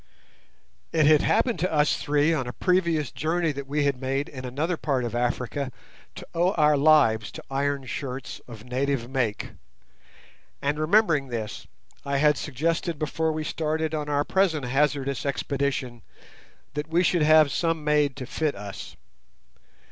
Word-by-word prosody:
It 155 -2 +3
had 150 0 +6
happened 235 -8 +1
to 180 +3 0
us 150 -1 +3
three 150 +2 +2
on 130 -6 -1
a 125 - -5
previous 170 -6 +1
journey 165 +1 0
that 140 -1 -7
we 145 +1 0
had 140 -2 0
made 135 +2 -1
in 130 -2 -8
another 150 +8 -1
part 140 -5 -1
of 120 - -3
Africa 125 +3 -2 0.4
to - - -9
owe 175 +3 +2
our 150 -4 +4
lives 140 -8 +4
to - - -9
iron 140 0 -1
shirts 130 +1 -6
of 115 -3 -10
native 130 -1 -1
make, 120 -5 -2 1.1
and 145 +2 -1
remembering 160 -4 +3
this, 115 -4 -5 0.4
I 140 0 -1
had 150 +1 +4
suggested 160 +4 -2
before 160 +2 -1
we 155 0 -3
started 155 0 -2
on 150 -1 -2
our 145 0 +1
present 165 -6 +1
hazardous 140 0 0
expedition 140 -3 -2 0.7
that 150 +1 -3
we 170 +3 +2
should 175 -1 +2
have 155 -1 +6
some 165 -2 0
made 150 -2 +2
to 130 - -6
fit 150 +3 -1
us. 100 -1 -8
145 Hz, 155 wpm, -25 LUFS, 135-155 Hz, 1.1 s, had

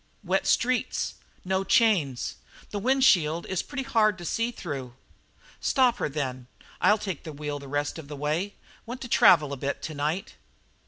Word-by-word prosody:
"Wet 190 +1 0
streets 250 +1 +1 0.3
no 190 +1 0
chains 185 - +2 0.3
this 205 - -3
wind 265 +4 +2
shield 170 -8 +4
is 190 - -1
pretty 275 -2 -5
hard 215 -5 +2
to 175 - -8
see 230 +6 0
through." 135 - -6 0.6
"Stop 250 -3 +3
her, - - -1
then. 130 -4 -4 0.3
I'll 210 - +5
take 190 -7 -5
the 160 - -7
wheel 145 0 -5
the 140 - -10
rest 145 +3 -2
of 150 - -10
the 150 - -7
way. 155 +8 -2 0.3
Want 245 +2 -6
to 245 - -5
travel 170 - +5
a - - -4
bit 140 +2 -3
to 155 - -4
night." 155 +6 -3
175 Hz, 175 wpm, -27 LUFS, 145-215 Hz, 0.6 s, I'll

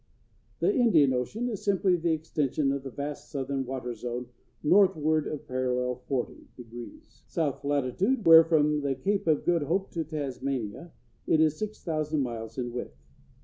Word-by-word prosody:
The 400 - +3
Indian 165 - +4
Ocean 165 - -2
is 215 -3 -4
simply 195 -3 +2
the 170 -1 0
extension 150 -3 0
of 140 0 -2
the 135 - -7
vast 145 +2 -6
southern 135 -1 -3
water 125 -2 -4
zone 120 +1 -5 0.3
northward 155 -4 +3
of 150 - -6
parallel 125 -1 -1
40°, 130 -3 -2 0.8
south 155 -6 -2
latitude, 145 - 0
where, 165 0 +10
from 150 -2 +2
the 140 -1 -1
Cape 195 +8 -1
of 155 -2 +2
Good 175 -2 +2
Hope 180 +7 -1
to 165 - -2
Tasmania, 140 -2 -4 0.4
it 160 - +3
is 155 -1 +3
six 215 0 -5
thousand 155 -2 -1
miles 115 -2 -6
in 120 -2 -3
width. 120 +1 -6
150 Hz, 155 wpm, -28 LUFS, 130-165 Hz, 0.8 s, where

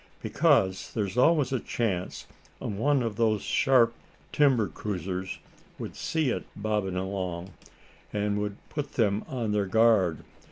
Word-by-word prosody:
"Because 95 0 +2
there's 100 -3 -1
always 140 +1 +4
a 130 - +1
chance 100 -8 -2 0.3
one 130 +6 0
of 110 -3 -3
those 110 -3 +2
sharp 125 -4 +3 0.4
timber 135 -8 +3
cruisers 95 -1 -4 0.4
would - - -7
see 155 -6 0
it - - -3
bobbin' 105 -3 -1
along, 95 -1 -3 0.6
and 105 0 0
that 105 - -1
would 105 -1 -6
put 145 -2 -4
them 105 -3 +1
on 120 -5 -2
their 105 -1 +1
guard. 105 -5 +3
105 Hz, 135 wpm, -28 LUFS, 95-120 Hz, 0.6 s, always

